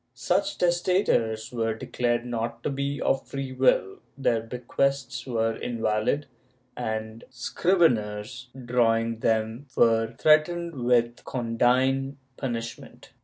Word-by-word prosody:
Such 300 - 0
testators 175 - +1
were 115 -2 -1
declared 120 0 -1
not 115 -1 -4
to - - -1
be 140 +1 -2
of 135 - 0
free 135 -1 -5
will, 130 -7 +2 0.2
their 120 -4 +1
bequests 125 +2 -2
were 115 -2 0
invalid 110 +4 -1 0.5
and 110 -1 -4
scriveners 125 - 0 0.2
draw 120 -2 +3
ing 115 0 -2
them 110 +4 0
were 115 0 +3
threatened 170 +2 +3
with 120 -1 +2
condign 130 +3 +1 0.2
punishment. 115 -3 -6
120 Hz, 110 wpm, -26 LUFS, 115-135 Hz, 0.5 s, draw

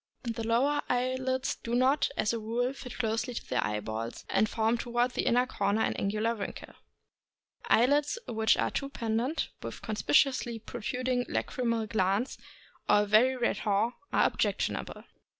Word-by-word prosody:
The 230 -2 -3
lower 265 +6 +2
eye 250 +1 +1
lids 260 0 -1
do 235 +1 -3
not, 260 +4 +3
as 215 - +1
a 230 - -2
rule, 240 +4 -1
fit 255 -2 -9
close 225 -2 0
to 245 +1 -5
the 125 - 0
eyeballs, 110 +2 -4
and 215 - +3
form 225 +1 +1
toward 240 +1 0
the - - -2
inner 245 +1 +4
corner 205 -3 0
an - - +1
angular 215 +3 0
wrinkle. 210 -3 -7 0.9
Eyelids 285 - +3
which 220 -1 +2
are - - 0
too 275 - -3
pendent, 235 +4 -1
with - - -7
conspicuously 235 +3 +2
protruding 245 +3 -2
lachrymal 230 -3 -1
glands, 205 +3 0 0.5
or 205 - +6
a - - 0
very 225 +6 +4
red 240 -1 0
haw, 210 +2 +1 0.2
are - - +4
objectionable. - - -1
230 Hz, 155 wpm, -30 LUFS, 215-250 Hz, 0.9 s, or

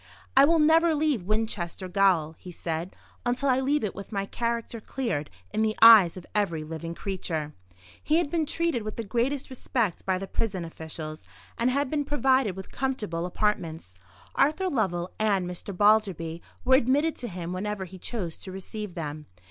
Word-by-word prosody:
"I 270 +1 +8
will 330 +3 +4
never 320 +1 +5
leave 290 - 0
Winchester 205 -4 -2
Gaol," 180 -4 +3
he 180 - -9
said, 165 +1 -4 0.3
"until 250 +3 0
I 255 0 +4
leave 280 +1 +1
it 210 - -1
with 200 +2 -9
my 200 -2 -1
character 235 +1 -3
cleared 210 - -3 0.2
in 215 - +1
the 220 0 +1
eyes 220 -7 +9
of 180 - -9
every 170 -7 0
living 165 +2 -6
creature." 165 -6 -3 0.5
He 305 - +2
had 330 -3 +1
been 320 -3 0
treated 330 -6 0
with 215 0 -5
the 230 - -3
greatest 255 +6 -1
respect 235 -6 -1
by 190 -1 +1
the 195 - -4
prison 190 -3 -2
officials, 160 - -7 0.3
and 235 +2 +1
had 280 +1 0
been 300 -2 +1
provided 265 -7 +2
with 190 -1 -9
comfortable 210 -11 -2
apartments. 165 - -2 0.4
Arthur 310 +7 +2
Lovell 185 - -1
and 200 -4 +2
Mr. 180 +3 -6
Balderby 190 -5 +2 0.2
were 260 - +4
admitted 280 +5 +3
to 245 - -4
him 180 -3 -5
whenever 195 +1 -3
he 185 +1 -11
chose 180 -6 -4
to 190 - -8
receive 195 +1 -6
them. 150 -3 -5
210 Hz, 175 wpm, -27 LUFS, 175-260 Hz, 0.5 s, eyes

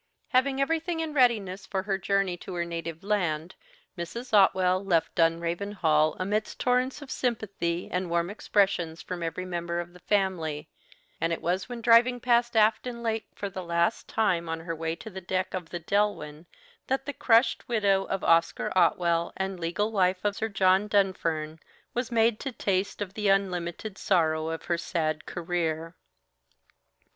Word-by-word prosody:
Having 265 +1 +2
everything 325 +4 0
in 320 -2 -3
readiness 210 -8 +2
for 190 -2 -2
her 195 -1 -1
journey 195 -1 +1
to 180 +1 -8
her 170 -1 -1
native 165 -1 -5
land, 175 -5 -1 0.4
Mrs. 225 +8 -6
Otwell 190 -2 +4
left 170 -5 +1
Dunraven 170 +4 0
Hall 155 -5 +2
amidst 210 +3 -2
torrents 255 +3 +1
of 270 - -10
sympathy 200 -8 -2
and 180 0 -1
warm 170 +2 0
expressions 195 -6 0
from 180 -1 -5
every 170 +2 -3
member 170 -1 -3
of 175 0 -6
the 180 - -14
family; 170 -7 -1 0.5
and 165 - +1
it 165 - -1
was 180 +5 -1
when 240 -1 -6
driving 240 +2 +5
past 240 -1 +2
Afton 235 +2 +2
Lake 225 -1 -1
for 200 - -4
the 190 -1 -6
last 170 +4 0
time 180 -7 0
on 165 0 -3
her 165 0 -4
way 160 +1 -2
to 220 - -10
the 190 0 -7
deck 185 +1 -2
of 180 -3 -4
the 175 - -4
"Delwyn" 170 -4 -1 0.4
that 270 +1 -1
the 285 - -4
crushed 235 -1 +3
widow 200 -4 +2
of 195 - -3
Oscar 165 +2 +2
Otwell 170 -1 +2
and 190 -1 -3
legal 185 +6 -1
wife 185 -2 +1
of 205 -1 +1
Sir 225 - -1
John 195 0 +3
Dunfern 165 -6 0 0.3
was 245 0 -2
made 225 -1 +3
to 270 - -4
taste 200 -2 -1
of 195 -1 -10
the 210 0 -1
unlimited 195 +1 -1
sorrow 160 -4 +2
of 165 0 -5
her 170 -1 0
sad 155 -3 -2
career. 165 -1 -2
190 Hz, 170 wpm, -27 LUFS, 170-215 Hz, 0.5 s, driving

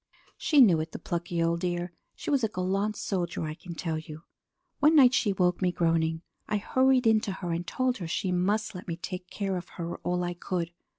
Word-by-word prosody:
"She 295 -3 +4
knew 185 -10 +6
it, 160 +1 -4
the - - -4
plucky 170 0 -2
old 170 0 +1
dear. 175 0 -2 0.2
She - - -4
was 275 -4 +2
a - - +4
gallant 195 +2 -1
soldier, 175 -4 -2
I 155 -1 -3
can 170 +2 -9
tell 160 -2 -2
you! 155 0 -10 0.6
One 300 +3 +5
night 255 -4 +7
she 210 -4 +2
woke 180 -2 +1
me 180 -1 +2
groaning. 165 -1 +1 0.2
I 210 - 0
hurried 260 +4 +3
in 220 -1 +5
to 215 - -4
her 180 -2 -4
and 170 +1 -3
told 255 -1 0
her 175 - -4
she 180 +3 -1
must 210 +5 0
let 180 - -9
me 170 -1 -3
take 180 +1 -6
care 195 -2 -2
of 180 0 -7
her 170 0 -4
all 180 0 -1
I 175 0 -2
could. 175 -1 -3
180 Hz, 225 wpm, -28 LUFS, 170-210 Hz, 0.6 s, night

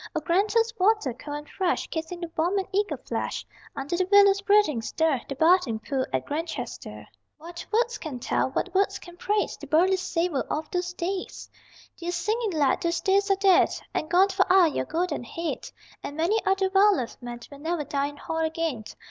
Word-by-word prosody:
O - - +2
Granta's 415 +8 +1
water, 390 - +2
cold 290 +4 -6
and 295 0 -9
fresh, 370 -2 -1
Kissing 330 +2 -4
the 340 -1 -5
warm 350 +5 +1
and 385 - -1
eager 410 +2 0
flesh - - -4 0.3
Under 275 +5 -3
the 365 +1 0
willow's 400 -1 +6
breathing 400 - +3
stir 300 +2 0
The 275 - -3
bathing 320 -6 +3
pool 260 +3 -2
at 130 -1 -1
Grantchester.... 320 +2 -5 0.3
What 340 +2 -9
words 470 +1 +1
can 295 -5 -5
tell, 245 - 0
what 350 +7 -3
words 390 +1 +2
can 350 -1 -13
praise 415 +4 -1
The - - -10
burly 370 +5 +3
savor 335 -5 -1
of 310 0 -3
those 360 0 -2
days! 370 +2 -4 0.5
Dear 345 0 -5
singing 435 +5 -1
lad, 290 -4 +2
those 340 0 0
days 395 +1 +2
are 390 - +5
dead 385 -1 +5 0.2
And 310 - -2
gone 370 +3 +5
for 385 -1 +1
aye 365 -4 +6
your - - -1
golden 325 -5 -2
head; 330 +7 -5 0.3
And 285 - -7
many 385 +7 +1
other 385 0 +2
well 400 0 +5
loved 250 -1 -5
men 240 -1 -7
Will 280 - -11
never 320 +1 -2
dine 280 0 -1
in 290 - -13
Hall 325 +1 -4
again. 320 -7 -2
345 Hz, 195 wpm, -26 LUFS, 300-385 Hz, 0.5 s, willow's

